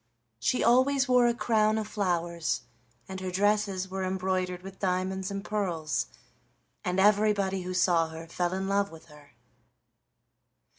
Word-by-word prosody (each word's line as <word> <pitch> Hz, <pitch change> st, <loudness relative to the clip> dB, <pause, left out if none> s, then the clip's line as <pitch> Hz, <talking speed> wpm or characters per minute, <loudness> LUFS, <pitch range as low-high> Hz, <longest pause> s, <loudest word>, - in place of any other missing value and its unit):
She 130 Hz, -, +1 dB
always 260 Hz, +3 st, +4 dB
wore 250 Hz, -1 st, +5 dB
a 235 Hz, -, +2 dB
crown 215 Hz, -2 st, +2 dB
of 215 Hz, -1 st, -2 dB
flowers, 175 Hz, -5 st, -1 dB, 0.5 s
and 190 Hz, 0 st, -6 dB
her 185 Hz, 0 st, -4 dB
dresses 200 Hz, 0 st, +1 dB
were 190 Hz, 0 st, -4 dB
embroidered 185 Hz, -1 st, -1 dB
with 195 Hz, 0 st, -10 dB
diamonds 190 Hz, 0 st, -1 dB
and 200 Hz, 0 st, -5 dB
pearls, 170 Hz, -, -1 dB, 0.8 s
and 180 Hz, +1 st, -1 dB
everybody 200 Hz, -1 st, +3 dB
who 180 Hz, 0 st, -5 dB
saw 175 Hz, -2 st, +3 dB
her 160 Hz, +1 st, -8 dB
fell 175 Hz, +2 st, -2 dB
in 190 Hz, +1 st, -2 dB
love 200 Hz, 0 st, +1 dB
with 160 Hz, -1 st, -13 dB
her. 145 Hz, -2 st, -17 dB
190 Hz, 145 wpm, -28 LUFS, 180-210 Hz, 0.8 s, wore